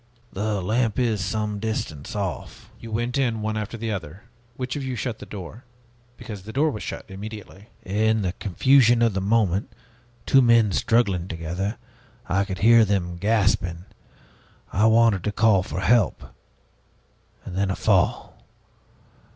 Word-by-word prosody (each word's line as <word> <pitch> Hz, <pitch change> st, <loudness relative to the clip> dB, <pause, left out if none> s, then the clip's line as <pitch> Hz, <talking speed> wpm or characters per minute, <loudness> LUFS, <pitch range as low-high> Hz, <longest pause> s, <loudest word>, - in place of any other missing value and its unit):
"The 105 Hz, -1 st, -2 dB
lamp 110 Hz, +2 st, 0 dB
is 115 Hz, -6 st, 0 dB
some 105 Hz, +2 st, -2 dB
distance 100 Hz, -10 st, -4 dB
off." 95 Hz, -7 st, -5 dB
"You 115 Hz, -, -9 dB
went 120 Hz, +4 st, -1 dB
in 115 Hz, -5 st, 0 dB
one 110 Hz, 0 st, -2 dB
after 110 Hz, +2 st, -4 dB
the 115 Hz, 0 st, -3 dB
other. 90 Hz, -1 st, -6 dB, 0.3 s
Which 130 Hz, 0 st, -4 dB
of 145 Hz, -, -4 dB
you 130 Hz, -1 st, -3 dB
shut 120 Hz, -2 st, -4 dB
the -, -, -10 dB
door? 105 Hz, +4 st, -9 dB, 0.5 s
Because 110 Hz, -5 st, -8 dB
the 105 Hz, +4 st, -9 dB
door 150 Hz, +6 st, +1 dB
was 105 Hz, -, -6 dB
shut -, -, -6 dB
immediately." 105 Hz, 0 st, -9 dB, 0.2 s
"In 110 Hz, +2 st, +1 dB
the 90 Hz, -1 st, -1 dB
confusion 120 Hz, +4 st, +3 dB
of 115 Hz, -3 st, +2 dB
the 95 Hz, -, -1 dB
moment 100 Hz, -1 st, +1 dB, 0.5 s
two 135 Hz, -, +5 dB
men 115 Hz, -4 st, +4 dB
struggling 100 Hz, -6 st, +1 dB
together 90 Hz, +5 st, -4 dB, 0.5 s
I 95 Hz, +2 st, +1 dB
could 95 Hz, -2 st, -5 dB
hear 115 Hz, 0 st, +7 dB
them 90 Hz, -4 st, -1 dB
gasping 90 Hz, -4 st, 0 dB, 0.9 s
I 105 Hz, +4 st, +4 dB
wanted 110 Hz, -4 st, +4 dB
to 105 Hz, -, 0 dB
call 105 Hz, -2 st, +3 dB
for 90 Hz, 0 st, -5 dB
help 105 Hz, +1 st, +2 dB, 1.2 s
then 95 Hz, +2 st, -2 dB
a 95 Hz, -, -1 dB
fall! -, -, 0 dB
105 Hz, 150 wpm, -24 LUFS, 95-115 Hz, 1.2 s, hear